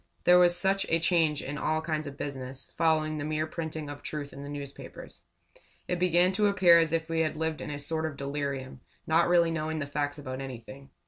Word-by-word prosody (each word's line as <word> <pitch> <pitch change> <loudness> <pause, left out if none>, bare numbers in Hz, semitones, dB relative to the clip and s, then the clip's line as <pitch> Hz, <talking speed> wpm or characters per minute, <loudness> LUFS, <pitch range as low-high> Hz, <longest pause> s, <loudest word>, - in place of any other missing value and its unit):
There 180 0 +7
was 175 0 +5
such 195 +2 +2
a 165 - +4
change 165 -3 +2
in 145 +2 -5
all 155 0 0
kinds 155 -1 -3
of 140 0 -8
business, 135 -2 -5
following 155 -1 +2
the 145 - -3
mere 155 +1 -1
printing 160 -1 -5
of 145 0 -8
truth 145 -2 -5
in 140 - -9
the 140 - -7
newspapers. 140 -1 -9 0.6
It 180 - -1
began 180 0 +4
to 205 +2 +2
appear 185 -4 +6
as 165 -2 +1
if 165 -1 0
we 165 0 -1
had 155 -1 0
lived 160 0 -2
in - - -5
a 145 - -4
sort 160 +2 -2
of 145 -3 -7
delirium 140 -2 -4 0.2
not 165 +2 +3
really 170 -1 +4
knowing 160 0 -2
the 150 - -2
facts 145 0 -2
about 130 -2 -6
anything. 135 +1 -9
155 Hz, 215 wpm, -29 LUFS, 145-165 Hz, 0.6 s, There